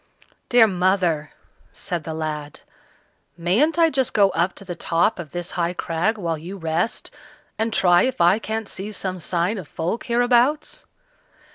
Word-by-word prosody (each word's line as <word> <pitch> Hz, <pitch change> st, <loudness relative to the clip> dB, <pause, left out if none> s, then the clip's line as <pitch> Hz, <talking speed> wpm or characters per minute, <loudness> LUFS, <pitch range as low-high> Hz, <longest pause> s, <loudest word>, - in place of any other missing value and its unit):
"Dear 240 Hz, -2 st, +7 dB
mother," 180 Hz, -6 st, +1 dB, 0.4 s
said 170 Hz, -4 st, -4 dB
the 160 Hz, -, -4 dB
lad, 150 Hz, -2 st, -5 dB, 0.8 s
"mayn't 215 Hz, -, +2 dB
I 330 Hz, -1 st, +4 dB
just 265 Hz, -3 st, 0 dB
go 200 Hz, -2 st, +5 dB
up 175 Hz, +3 st, 0 dB
to 195 Hz, -, -9 dB
the 180 Hz, -, -5 dB
top 170 Hz, +4 st, 0 dB
of 160 Hz, -4 st, -7 dB
this 175 Hz, -1 st, -4 dB
high 175 Hz, 0 st, -1 dB
crag 175 Hz, +5 st, -1 dB
while 165 Hz, -5 st, -2 dB
you 180 Hz, +5 st, -8 dB
rest, 165 Hz, +4 st, -2 dB, 0.5 s
and 225 Hz, +1 st, 0 dB
try 175 Hz, -4 st, +4 dB
if 260 Hz, -, -1 dB
I 175 Hz, +5 st, +4 dB
can't 220 Hz, -1 st, -4 dB
see 195 Hz, +3 st, -5 dB
some 185 Hz, -3 st, -4 dB
sign 175 Hz, +5 st, -1 dB
of 175 Hz, -, -9 dB
folk 170 Hz, +11 st, -3 dB
hereabouts?" 245 Hz, +4 st, +1 dB
185 Hz, 160 wpm, -22 LUFS, 170-220 Hz, 0.8 s, Dear